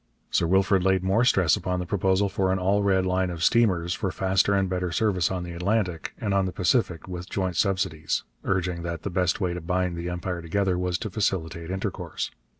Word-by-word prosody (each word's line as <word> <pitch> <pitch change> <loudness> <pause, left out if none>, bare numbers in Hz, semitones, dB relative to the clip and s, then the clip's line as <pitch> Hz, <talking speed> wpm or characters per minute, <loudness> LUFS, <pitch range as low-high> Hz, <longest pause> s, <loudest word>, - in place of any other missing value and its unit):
Sir 85 - +2
Wilfrid 95 +1 +3
laid 95 -1 +2
more 95 +5 +2
stress 95 -10 +4
upon 90 -1 -2
the 90 - -3
proposal 95 +1 +1
for 95 -1 0
an 95 - +1
All 100 +2 +2
Red 95 -2 +2
line 95 0 +1
of 85 -2 -4
steamers 90 -7 +3
for 100 -2 -2
faster 95 +2 +2
and 95 -1 +2
better 90 -1 -2
service 95 -1 +1
on 90 -2 -3
the 90 - -6
Atlantic 90 -1 -1
and 105 -5 -1
on 95 -1 +2
the - - -3
Pacific, 90 -3 0
with 90 0 -6
joint 95 -3 -2
subsidies, 95 -4 0 0.2
urging 90 -2 -1
that 85 -1 -5
the 100 - -3
best 90 -1 +1
way 90 -3 0
to 90 - -5
bind 90 +1 -1
the 85 +1 -4
Empire 90 0 -3
together 95 +3 0
was 90 0 -1
to 110 - -5
facilitate 85 -5 -2
intercourse. 95 +1 -4
95 Hz, 210 wpm, -26 LUFS, 90-95 Hz, 0.2 s, stress